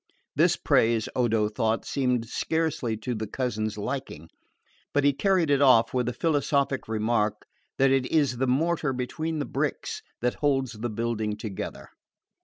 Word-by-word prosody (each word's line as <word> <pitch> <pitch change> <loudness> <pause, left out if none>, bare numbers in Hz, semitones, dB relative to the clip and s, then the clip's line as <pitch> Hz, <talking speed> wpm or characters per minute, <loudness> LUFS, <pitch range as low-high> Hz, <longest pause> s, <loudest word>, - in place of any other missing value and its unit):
This - - +4
praise, 115 -1 +2
Odo 115 -4 +2
thought, 110 +1 -1
seemed 125 -4 0
scarcely 155 -5 -1
to 125 +3 -3
the 110 -1 -4
cousin's 110 -3 -2
liking; 105 - -5 0.7
but 145 - +3
he 140 0 +4
carried 180 -1 +2
it 140 0 +3
off 130 -5 +5
with 125 -2 0
the - - +1
philosophic 140 -1 0
remark 110 -1 0 0.3
that 135 0 +4
it 135 -1 +2
is 140 -6 +1
the 130 +2 0
mortar 155 +2 +1
between 155 +6 -3
the 145 - -2
bricks - - -3 0.2
that 125 0 0
holds 135 -4 +1
the 120 +1 -4
building 110 -1 -2
together. 105 -3 -6
125 Hz, 155 wpm, -26 LUFS, 110-140 Hz, 0.7 s, off